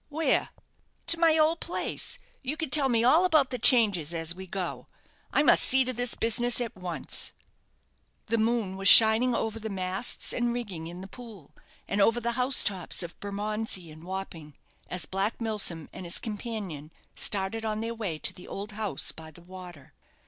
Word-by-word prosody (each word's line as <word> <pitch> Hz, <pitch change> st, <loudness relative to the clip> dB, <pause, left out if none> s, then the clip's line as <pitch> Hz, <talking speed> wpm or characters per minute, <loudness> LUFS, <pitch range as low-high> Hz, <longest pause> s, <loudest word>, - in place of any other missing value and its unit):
"Where?" 315 Hz, +2 st, +1 dB, 0.6 s
"To 335 Hz, -, +4 dB
my 325 Hz, -2 st, +4 dB
old 315 Hz, +2 st, +2 dB
place. 345 Hz, -, -4 dB, 0.2 s
You 285 Hz, +3 st, -3 dB
can 315 Hz, -5 st, -4 dB
tell 280 Hz, -2 st, +6 dB
me 230 Hz, -2 st, +2 dB
all 310 Hz, +9 st, +5 dB
about 310 Hz, -8 st, +3 dB
the 250 Hz, -, -3 dB
changes 205 Hz, -, +3 dB
at 165 Hz, 0 st, -2 dB
we 190 Hz, +1 st, -10 dB
go. 180 Hz, -1 st, -5 dB, 0.4 s
I 290 Hz, -, +2 dB
must 290 Hz, -, +5 dB
see 265 Hz, 0 st, +5 dB
to 255 Hz, -, -3 dB
this 245 Hz, 0 st, -2 dB
business 240 Hz, +2 st, +1 dB
at 235 Hz, -3 st, -4 dB
once." 175 Hz, -6 st, -4 dB, 0.9 s
The 230 Hz, +1 st, 0 dB
moon 220 Hz, -4 st, -1 dB
was 195 Hz, 0 st, +1 dB
shining 225 Hz, +4 st, +8 dB
over 225 Hz, 0 st, -3 dB
the 220 Hz, 0 st, -6 dB
masts 190 Hz, +3 st, -2 dB
and 240 Hz, -1 st, -1 dB
rigging 190 Hz, -9 st, -6 dB
in 175 Hz, +2 st, -9 dB
the 190 Hz, -, -9 dB
Pool, 215 Hz, -, -13 dB, 0.4 s
and 200 Hz, -, 0 dB
over 230 Hz, +4 st, +3 dB
the 235 Hz, 0 st, -2 dB
house 250 Hz, +2 st, +3 dB
tops 185 Hz, -3 st, -2 dB
of 175 Hz, 0 st, -10 dB
Bermondsey 205 Hz, -3 st, -3 dB
and 155 Hz, +1 st, -14 dB
Wapping, 175 Hz, -5 st, -7 dB, 0.3 s
as 180 Hz, -3 st, -3 dB
Black 195 Hz, +6 st, -2 dB
Milsom 205 Hz, -9 st, 0 dB
and -, -, -8 dB
his 175 Hz, +1 st, -2 dB
companion 205 Hz, -9 st, -6 dB, 0.2 s
started 205 Hz, +3 st, 0 dB
on 215 Hz, -1 st, -2 dB
their 230 Hz, +1 st, -3 dB
way 205 Hz, -9 st, -4 dB
to -, -, 0 dB
the 180 Hz, -, -13 dB
old 200 Hz, +2 st, -6 dB
house 210 Hz, -1 st, -1 dB
by 160 Hz, -1 st, -12 dB
the 170 Hz, +2 st, -17 dB
water. 180 Hz, -5 st, -12 dB
215 Hz, 185 wpm, -27 LUFS, 185-240 Hz, 0.9 s, shining